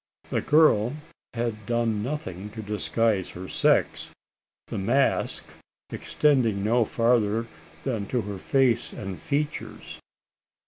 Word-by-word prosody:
The -, -, +1 dB
girl 145 Hz, -6 st, +4 dB, 0.4 s
had 115 Hz, -3 st, -3 dB
done 115 Hz, -3 st, 0 dB
nothing 105 Hz, -, -4 dB
to 110 Hz, -, -4 dB
disguise 105 Hz, -1 st, 0 dB
her 90 Hz, +2 st, -8 dB
sex -, -, +1 dB, 0.6 s
the -, -, -4 dB
mask 120 Hz, +8 st, +1 dB, 0.4 s
extending 125 Hz, -9 st, +1 dB
no 115 Hz, +2 st, +3 dB
farther 115 Hz, -1 st, +2 dB, 0.4 s
than 110 Hz, -7 st, -2 dB
to 125 Hz, +2 st, 0 dB
her 100 Hz, -2 st, -6 dB
face 125 Hz, 0 st, +2 dB
and 95 Hz, -3 st, -6 dB
features. 145 Hz, +1 st, -4 dB
115 Hz, 110 wpm, -26 LUFS, 105-125 Hz, 0.6 s, girl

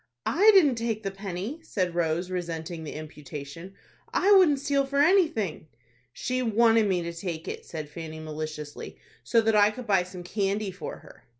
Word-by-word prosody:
"I 405 Hz, +7 st, +5 dB
didn't 290 Hz, -11 st, +5 dB
take 225 Hz, -2 st, -2 dB
the 195 Hz, -, -2 dB
penny," 195 Hz, -, -5 dB
said 185 Hz, -, -2 dB
Rose, 170 Hz, +1 st, -1 dB
resenting 170 Hz, -2 st, -4 dB
the 150 Hz, -, -6 dB
imputation; 150 Hz, +3 st, -9 dB, 0.4 s
"I 400 Hz, -, +3 dB
wouldn't 365 Hz, -8 st, +6 dB
steal 280 Hz, 0 st, +1 dB
for 275 Hz, +1 st, -3 dB
anything." 290 Hz, -, +2 dB, 0.4 s
"She 255 Hz, -, -2 dB
wanted 225 Hz, -1 st, +4 dB
me 180 Hz, -3 st, 0 dB
to 170 Hz, 0 st, -5 dB
take 170 Hz, -2 st, -5 dB
it," -, -, -6 dB
said 155 Hz, -3 st, -6 dB
Fanny, 160 Hz, +1 st, -8 dB
maliciously, 155 Hz, -1 st, -6 dB, 0.3 s
"so 230 Hz, -, +3 dB
that 225 Hz, -1 st, +2 dB
I 205 Hz, 0 st, +6 dB
could 245 Hz, +3 st, -8 dB
buy 195 Hz, -4 st, +3 dB
some 180 Hz, 0 st, -8 dB
candy 200 Hz, +2 st, -1 dB
for 185 Hz, -, -7 dB
her." -, -, -17 dB
195 Hz, 175 wpm, -27 LUFS, 165-235 Hz, 0.4 s, wouldn't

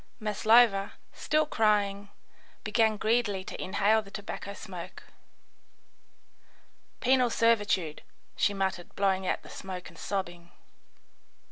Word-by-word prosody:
Maslova, 215 Hz, -1 st, +3 dB, 0.2 s
still 310 Hz, 0 st, +1 dB
crying, 205 Hz, -6 st, +1 dB, 0.5 s
began 220 Hz, -2 st, +2 dB
greedily 215 Hz, -3 st, +1 dB
to -, -, -6 dB
inhale 205 Hz, +3 st, +2 dB
the 200 Hz, -, -14 dB
tobacco 200 Hz, 0 st, -6 dB
smoke. 190 Hz, -4 st, -9 dB, 2.0 s
"Penal 255 Hz, -1 st, +3 dB
servitude," 205 Hz, -9 st, +1 dB, 0.3 s
she -, -, +2 dB
muttered, 190 Hz, -3 st, -3 dB
blowing 190 Hz, -1 st, +1 dB
out -, -, -1 dB
the -, -, -13 dB
smoke 185 Hz, -2 st, -7 dB
and -, -, -16 dB
sobbing. 175 Hz, -3 st, -4 dB
200 Hz, 105 wpm, -29 LUFS, 190-220 Hz, 2.0 s, Maslova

